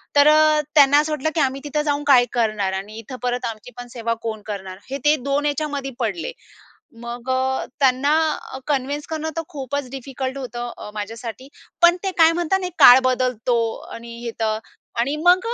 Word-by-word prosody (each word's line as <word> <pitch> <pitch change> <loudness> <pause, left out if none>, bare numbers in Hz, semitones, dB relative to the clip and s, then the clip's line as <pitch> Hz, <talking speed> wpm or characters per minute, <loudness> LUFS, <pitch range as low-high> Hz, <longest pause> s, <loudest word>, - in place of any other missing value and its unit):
तर 285 0 +6
अ, 305 0 +5
त्यांना 285 0 +7
असं 305 +1 0
वाटलं, 305 +1 -1
की - - +1
आम्ही 270 0 0
तिथं 300 +1 -1
जाऊन 290 -1 -1
काय 250 -3 +6
करणार 215 -5 0
आणि 205 +3 -6
इथं 230 +3 -8
परत 245 0 -1
आमची 225 +1 -6
पण 245 0 -8
सेवा 230 -1 -2
कोण 220 -2 -4
करणार, 190 -3 -6
हे 275 - -3
ते 300 +1 +6
2 280 +1 0
याच्यामध्ये 285 -2 -2
पडले. 325 - -2 0.7
मग 240 +1 -6
अ, 260 0 0 0.2
त्यांना 270 +2 +3 0.5
कन्विन्स 285 +1 -1
करणं 315 0 -3
तर 330 - -1
खूपच 280 -3 -4
डिफिकल्ट 265 0 -5
होतं 240 -2 -5
अ, - - -8
माझ्यासाठी. 225 +5 -6 0.3
पण 345 +1 +7
ते 385 - 0
काय 325 0 +7
म्हणतात 350 +3 0
एक 360 - -4
काळ 245 +1 +10
बदलतो 250 -2 +1 0.4
आणि 235 0 -9
हे 235 - -2
तर 220 -1 +1 0.4
आणि 275 +5 0
मग 360 +1 +6
265 Hz, 180 wpm, -21 LUFS, 235-295 Hz, 0.7 s, काळ